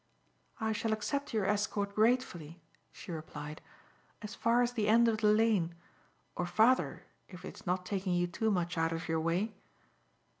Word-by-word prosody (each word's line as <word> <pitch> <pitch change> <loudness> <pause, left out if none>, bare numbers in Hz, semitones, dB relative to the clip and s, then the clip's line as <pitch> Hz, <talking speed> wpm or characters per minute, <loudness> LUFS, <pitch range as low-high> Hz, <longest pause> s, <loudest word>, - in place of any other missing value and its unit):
"I 220 -1 0
shall 220 +1 0
accept 280 +7 -2
your 215 -4 0
escort 205 0 0
gratefully," 210 -8 +1 0.3
she - - -10
replied, 155 -1 -7 0.6
"as 210 - -6
far 235 +1 +2
as 240 0 -1
the 220 -4 0
end 230 +2 +5
of 220 -1 +1
the 215 - +3
lane, 210 -6 +2 0.6
or 180 - -2
farther 220 +8 +3 0.3
if 180 -1 -10
it - - -7
is - - -16
not 180 +1 0
taking 190 -1 -1
you 175 0 +2
too 200 +6 -1
much 175 -4 0
out 165 0 +1
of 165 +2 -4
your 160 0 0
way." 180 +7 0
205 Hz, 175 wpm, -32 LUFS, 175-220 Hz, 0.6 s, end